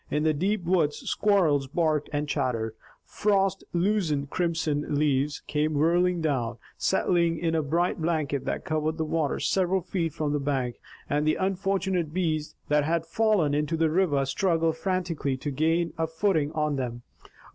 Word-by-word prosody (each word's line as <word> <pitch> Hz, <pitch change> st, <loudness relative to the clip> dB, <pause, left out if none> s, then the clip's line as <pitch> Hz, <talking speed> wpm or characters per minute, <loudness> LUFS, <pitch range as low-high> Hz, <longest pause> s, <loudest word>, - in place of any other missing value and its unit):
In 150 Hz, +1 st, 0 dB
the 155 Hz, 0 st, +3 dB
deep 190 Hz, +6 st, 0 dB
woods 170 Hz, -4 st, +1 dB
squirrels 165 Hz, -10 st, +2 dB
barked 155 Hz, 0 st, 0 dB
and 145 Hz, 0 st, -1 dB
chattered. 115 Hz, -6 st, -1 dB, 0.3 s
Frost 195 Hz, -2 st, +1 dB
loosened 170 Hz, -6 st, 0 dB
crimson 160 Hz, -4 st, -1 dB
leaves 145 Hz, 0 st, +1 dB
came 150 Hz, +1 st, 0 dB
whirling 175 Hz, +3 st, +2 dB
down, 130 Hz, -7 st, -1 dB, 0.2 s
settling 170 Hz, -3 st, +1 dB
in 165 Hz, 0 st, -1 dB
a 160 Hz, -, +2 dB
bright 170 Hz, +4 st, 0 dB
blanket 155 Hz, -4 st, -1 dB
that -, -, -3 dB
covered 155 Hz, +1 st, -1 dB
the 160 Hz, -, -1 dB
water 155 Hz, -2 st, -1 dB
several 190 Hz, 0 st, +1 dB
feet 165 Hz, -2 st, -2 dB
from 150 Hz, -1 st, -2 dB
the 145 Hz, -, +1 dB
bank, 135 Hz, -4 st, -1 dB, 0.3 s
and 150 Hz, +1 st, +1 dB
unfortunate 190 Hz, -2 st, 0 dB
bees 155 Hz, -4 st, -1 dB
that 150 Hz, 0 st, +3 dB
had 165 Hz, +2 st, 0 dB
fallen 195 Hz, -5 st, +2 dB
into 150 Hz, +3 st, 0 dB
the 160 Hz, -1 st, +2 dB
river 155 Hz, -6 st, +2 dB
struggled 165 Hz, +2 st, +1 dB
frantically 170 Hz, -6 st, -1 dB
to 145 Hz, +2 st, -4 dB
gain 165 Hz, +4 st, +1 dB
a 160 Hz, -, +1 dB
footing 160 Hz, -3 st, 0 dB
on 150 Hz, -2 st, 0 dB
them. 120 Hz, -2 st, -4 dB
160 Hz, 155 wpm, -27 LUFS, 145-175 Hz, 0.3 s, the